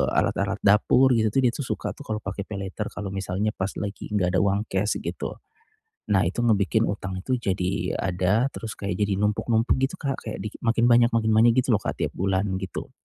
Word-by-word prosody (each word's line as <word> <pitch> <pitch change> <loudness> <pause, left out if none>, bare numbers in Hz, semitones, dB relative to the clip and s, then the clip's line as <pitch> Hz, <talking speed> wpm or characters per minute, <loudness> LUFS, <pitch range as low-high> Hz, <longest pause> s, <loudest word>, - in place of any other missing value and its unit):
alat-alat 100 +2 +1
dapur 110 +6 +5
gitu, 110 -1 +2 0.2
dia 125 - +4
tuh 130 +2 -5
suka - - -3
tuh 145 - -11
kalau 110 -1 -2
pakai 100 - -5
paylater, 100 +1 -4
kalau 100 -2 -5
misalnya 95 +2 -2
pas 95 0 -2
lagi 100 0 -5
enggak 95 -4 +1
ada - - +4
uang 100 +1 +1
cash, 95 +2 +1
gitu. - - -4 0.8
Nah 95 -3 +3
itu 95 +7 -1
ngebikin 110 0 +2
utang 95 -2 -4
itu 130 +4 0
jadi 95 -3 -1
ada, 95 +7 +1
terus 110 -1 -6
kayak 100 -3 -4
jadi 105 -1 +1
numpuk-numpuk 110 +2 +1
gitu 135 +5 0
Kak, 135 -4 -3
kayak 110 - -4
di 105 - -3 0.2
makin 115 0 +3
banyak 120 0 +6
makin 110 -1 +2
banyak 115 +2 +6
gitu 130 - -2
lho - - +3
Kak - - -3
tiap - - 0
bulan, 95 +1 0
gitu. 95 -2 -6
105 Hz, 200 wpm, -25 LUFS, 95-115 Hz, 0.8 s, banyak